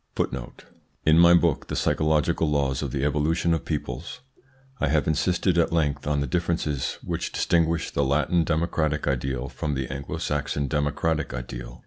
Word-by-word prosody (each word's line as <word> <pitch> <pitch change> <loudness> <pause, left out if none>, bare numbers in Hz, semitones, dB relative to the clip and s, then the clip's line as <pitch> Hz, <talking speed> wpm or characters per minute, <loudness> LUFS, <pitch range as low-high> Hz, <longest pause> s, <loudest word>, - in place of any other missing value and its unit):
In 80 +1 +6
my 85 0 +8
book, 85 -4 +2
"The - - -4
Psychological 75 0 +1
Laws 70 -3 0
of - - -2
the 70 -2 -2
Evolution 80 +3 +1
of 80 - -1
Peoples," 70 - -5 0.6
I - - +1
have 75 +1 +2
insisted 85 +3 +1
at 85 - +2
length 75 -4 0
on 75 -1 +1
the - - 0
differences 75 -1 -1
which - - -3
distinguish 85 -1 +1
the 70 - +1
Latin 75 +5 +2
democratic 80 -1 0
ideal 65 -1 -1
from 75 +2 -3
the 65 0 -2
Anglo 70 +1 -5
Saxon 70 -1 -2
democratic 75 0 -1
ideal. - - -7
75 Hz, 155 wpm, -25 LUFS, 70-80 Hz, 0.6 s, my